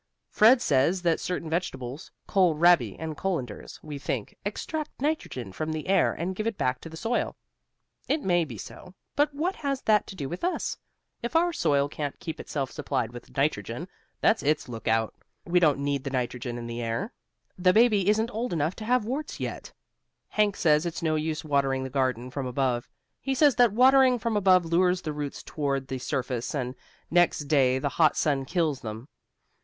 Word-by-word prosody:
Fred 240 +3 +6
says 155 +7 +2
that 170 -2 +2
certain 180 -2 -3
vegetables 150 -4 -4 0.2
kohl 185 -5 +3
rabi 155 - +4
and 160 -1 -5
colanders, 145 - -4
we 150 -2 -6
think 125 -6 -4
extract 300 +9 -3
nitrogen 260 - -2
from 155 +11 -3
the 155 -1 -4
air 190 -1 +4
and 180 +3 -3
give 215 +3 -2
it 225 -3 -2
back 125 0 0
to 165 - -8
the 160 - -9
soil. 230 +6 -1 0.7
It 300 0 0
may 175 -2 +3
be 125 -8 -7
so, 180 - -10 0.2
but 290 +1 +3
what 330 +7 -2
has 275 -2 -2
that 210 -2 +3
to - - -8
do 145 -7 -4
with 175 +5 -6
us? 360 - -1 0.5
If 235 +6 -4
our 345 +1 +3
soil 140 - +2
can't 145 -1 -5
keep 160 - -6
itself 135 -4 -3
supplied 115 - -2
with 120 - -11
nitrogen, 135 - -1 0.3
that's 220 - +3
its 150 0 +1
lookout. 115 -2 -1 0.3
We 180 +1 +3
don't 150 -5 +4
need 140 -1 -1
the - - -3
nitrogen 125 -2 -3
in 120 - -6
the 120 0 -5
air. 120 - -3 0.5
The 180 0 +5
baby 210 -2 +4
isn't 220 +3 +2
old 230 +1 -2
enough 160 +2 0
to 215 - -6
have 245 -1 +2
warts 275 +7 -4
yet. - - -5 0.6
Hank 210 -2 +2
says 150 -2 +3
it's 170 +1 -5
no 160 -1 +2
use 155 0 -2
watering 135 -2 +1
the 130 - -6
garden 130 -2 -1
from 135 -1 -3
above. 125 -1 -1 0.3
He 270 0 -2
says 290 0 +5
that 245 -3 +6
watering 255 +2 +5
from 230 -1 -2
above 185 -3 +4
lures 180 +2 +2
the 155 - -3
roots 145 -1 -5
toward 140 -3 -2
the 130 -1 -3
surface 125 0 -3
and 125 -3 -2 0.4
next 175 -2 +3
day 135 -3 +3
the 130 - -1
hot 155 - +5
sun 140 -3 +1
kills 160 -4 0
them. 110 +3 -7
160 Hz, 190 wpm, -27 LUFS, 135-205 Hz, 0.7 s, Fred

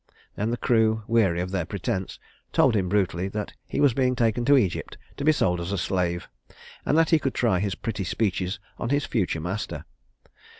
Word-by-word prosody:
Then 105 +2 -1
the 120 - -1
crew, 110 -3 +2
weary 100 -7 +2
of 90 +1 -4
their 95 -3 0
pretense, 95 0 -3 0.3
told 130 -4 +4
him 95 -3 +1
brutally 95 -2 +1
that 105 +1 -4
he - - -3
was 145 -4 +5
being 125 0 +1
taken 120 0 +1
to 140 +2 +6
Egypt 100 -9 -1 0.2
to - - -4
be 155 - +6
sold 90 - +1
as 85 +3 -4
a 100 - -1
slave; 90 -1 -1 0.6
and 150 - +3
that 165 0 +3
he 160 - +6
could 135 -3 -2
try 110 -7 +2
his 100 0 -1
pretty 105 -3 -3
speeches 95 0 -1 0.2
on 120 - -2
his 145 +1 +1
future 95 -8 -1
master. 90 +6 -4
105 Hz, 200 wpm, -25 LUFS, 90-120 Hz, 0.6 s, to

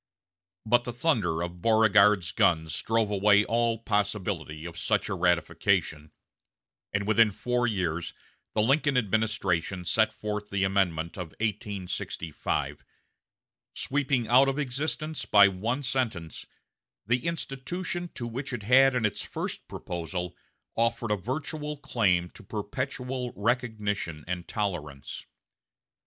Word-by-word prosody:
But 120 +2 +4
the 120 - -5
thunder 110 - +1
of 85 0 -6
Beauregard's 105 -4 +5
guns 80 -2 +2
drove 115 -2 +1
away 105 +1 +5
all 115 0 +1
possibility 100 -7 -2
of 85 -1 -7
such 105 +5 0
a - - -1
ratification, 85 -3 +1 0.8
and 100 0 -1
within 110 +1 +5
four 120 +4 0
years 85 -6 -2 0.4
the 105 - +3
Lincoln 140 +2 +3
administration 100 -5 0
sent 110 +4 +3
forth 105 -1 -4
the 100 -1 0
amendment 90 -4 0
of 90 -4 -6
1865, 100 -6 -3 0.9
sweeping 135 -4 0
out 130 +3 +6
of 135 - -2
existence 150 +3 -2
by 100 -1 +8
one 115 +9 -2
sentence 115 - -2 0.6
the 120 +8 +1
institution 170 +3 -3
to 120 - -4
which 130 +5 -5
it 115 -4 -4
had 130 +4 +6
in 120 -3 +2
its 105 - -1
first - - -5
proposal 90 +1 -5 0.4
offered 115 -1 0
a - - +4
virtual 150 - -4
claim 95 -10 +1
to - - -13
perpetual 125 +4 -4
recognition 105 - -1
and 90 0 -4
tolerance. 75 -10 -4
105 Hz, 120 wpm, -28 LUFS, 90-125 Hz, 0.9 s, by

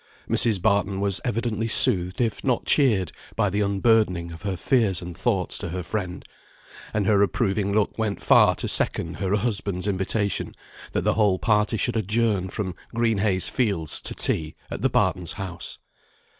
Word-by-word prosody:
Mrs. 110 -5 +3
Barton 100 -1 +1
was 100 -1 0
evidently 115 -1 -2
soothed, 95 -6 +4
if 110 -4 -1
not 125 -3 0
cheered, 110 - +2 0.2
by 105 -4 +1
the 105 +2 0
unburdening 100 -4 +1
of 80 0 -10
her 95 -2 -3
fears 110 -5 +1
and 90 -1 -8
thoughts 95 -3 -1
to - - -5
her 90 +2 -4
friend; 90 -1 -5 0.7
and 105 -2 -1
her 100 -1 +3
approving 100 -1 0
look 105 +2 0
went 105 -2 -1
far - - +5
to - - -4
second 85 +1 +1
her 95 0 0
husband's 100 -4 -1
invitation 100 +1 -1 0.4
that - - -1
the - - +2
whole 105 -4 +2
party 105 +1 +1
should 120 +3 0
adjourn 105 -2 0
from 95 -3 -4 0.2
Green 115 -3 +1
Heys 95 -3 +1
Fields 100 - -1
to - - -4
tea, 80 -1 +1 0.2
at - - -5
the - - +2
Bartons' 90 -3 0
house. 95 -4 -6
100 Hz, 170 wpm, -24 LUFS, 95-110 Hz, 0.7 s, far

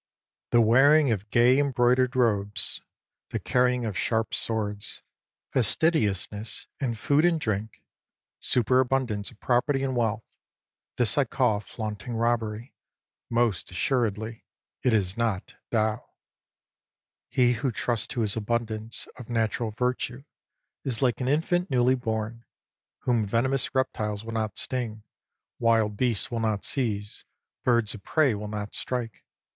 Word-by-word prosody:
The 120 - +5
wearing 135 +5 +5
of 105 -1 -2
gay 125 +4 +5
embroidered 125 -2 +2
robes, 105 -5 +2 0.5
the - - -2
carrying 125 -1 +1
of 105 -4 -3
sharp 110 +6 0
swords, 105 -2 +1 0.5
fastidiousness 110 - 0
in 125 -4 -1
food 140 +6 +2
and 170 -2 +3
drink, 105 -4 -3 0.6
superabundance 125 -3 +1
of - - -19
property 135 +2 +1
and 130 -1 -1
wealth: 115 -2 0 0.4
— - - -67
this - - +4
I - - +3
call 105 -2 +1
flaunting 110 +2 -6
robbery; 115 0 -1 0.6
most 115 -4 +1
assuredly 110 +2 -1 0.4
it 125 - +2
is 100 -3 +1
not 110 -5 -1 0.2
Tao. 110 -1 0 1.3
He 125 -2 +3
who 120 +3 -1
trusts 120 0 -1
to 120 - -3
his 105 -3 +1
abundance 110 0 -2
of 125 - -10
natural 115 0 0
virtue 125 +3 -2 0.6
is 130 -1 -2
like 125 -1 +1
an 125 - -1
infant 175 +5 +1
newly 125 -1 +3
born, 115 -2 -3 0.6
whom 120 -3 +1
venomous 125 +7 0
reptiles 105 -5 -1
will 115 - -6
not 110 -3 -2
sting, 115 -4 -3 0.6
wild 115 -3 +2
beasts 120 -1 0
will 115 - -1
not 110 -3 -1
seize, 105 -6 -2 0.4
birds 120 -4 +2
of 110 - -9
prey 145 +2 +2
will 105 0 -5
not 105 -1 -5
strike. 120 -4 -4
115 Hz, 130 wpm, -27 LUFS, 105-125 Hz, 1.3 s, The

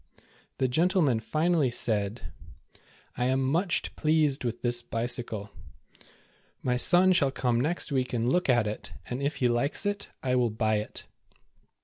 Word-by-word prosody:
The 130 - +1
gentleman 155 - +2
finally 155 +3 +1
said: 110 -2 -2 0.4
" - - -27
I 125 - +1
am 130 +1 +1
much 170 +7 0
pleased 155 -3 +1
with 120 -1 -4
this 120 -1 +1
bicycle. 115 -3 -4 1.1
My 125 -1 +1
son 180 +8 +5
shall 145 -6 +3
come 125 -3 0
next 160 +2 -1
week 130 -2 0
and 120 -1 -1
look 180 +4 +1
at 120 -3 +4
it, 105 0 -6
and 125 +2 -4
if 140 +2 -1
he 125 - +1
likes 120 - 0
it, 205 0 -2
I 130 -1 0
w^ill 120 -4 +1
buy 110 -1 +2
it." 105 - -6
125 Hz, 155 wpm, -28 LUFS, 120-155 Hz, 1.1 s, son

